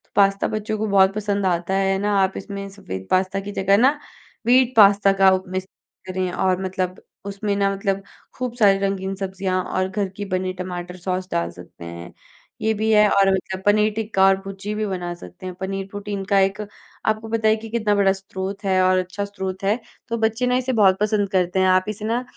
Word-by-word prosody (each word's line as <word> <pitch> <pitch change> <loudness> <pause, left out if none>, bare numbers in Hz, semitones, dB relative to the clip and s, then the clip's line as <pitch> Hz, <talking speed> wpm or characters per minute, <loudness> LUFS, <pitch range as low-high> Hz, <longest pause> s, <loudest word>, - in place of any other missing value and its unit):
Pasta 195 0 +3
बच्चों 215 0 -3
को 220 +1 -1
बहुत 195 -1 +4
पसंद 205 -2 -1
आता 175 0 0
है, 195 0 +2
है 190 - -1
ना? 205 0 +1
आप 190 0 0
इसमें 200 0 -6
सफेद 95 - -8
पास्ता 185 +1 +1
की - - -4
जगह 195 0 +2
ना 270 +6 +3 0.5
व्हीट 255 +1 +4
पास्ता 200 -1 +6
का 190 - +8
उप 185 0 +1
मिक्स 185 0 -3 0.4
करें 185 -1 -2
और 185 +1 0
मतलब 185 -1 -3 0.2
उसमें 200 +1 -2
ना 200 0 +2
मतलब 195 0 -2 0.3
खूब 250 -2 -3
सारी 200 -3 +5
रंगीन 195 -1 -2
सब्जियाँ 190 -1 -2
और 185 0 -1
घर 195 0 -2
की 205 - -4
बनी 185 0 -2
टमाटर 180 -1 -6
सॉस 185 +1 -3
डाल 170 0 0
सकते 85 -1 -13
हैं। 85 +1 -9 0.5
ये 220 0 +2
भी 220 +1 -1
है 210 -1 +6
और 195 -1 +4
मतलब 190 0 -3
पनीर 210 +1 +4
टिक्का 215 -3 +2
और 195 0 +6
भुर्जी 195 +1 -6
भी 215 0 -1
बना 180 -3 -3
सकते 90 - -12
हैं, 185 -1 -5
पनीर 195 0 -3
प्रोटीन 205 -1 -5
का 200 0 +3
एक 195 +2 +1 0.5
आपको 220 +1 0
पता 225 -1 +1
है 215 - +5
कि 220 0 -9
कितना 215 -2 +1
बड़ा 200 -1 +4
स्रोत 195 +1 -6
है 190 -1 +3
और 185 0 +4
अच्छा 185 +2 -3
स्रोत 190 -1 -6
है, 205 +5 +1 0.3
तो 230 - -2
बच्चे 225 +2 0
ना 250 0 +2
इसे 255 0 -1
बहुत 195 -4 +4
पसंद 210 -1 +1
करते 185 -1 +1
हैं। 190 - +4
आप 185 0 +3
इसे 215 0 -5
ना 235 +3 0
195 Hz, 215 wpm, -22 LUFS, 185-210 Hz, 0.5 s, का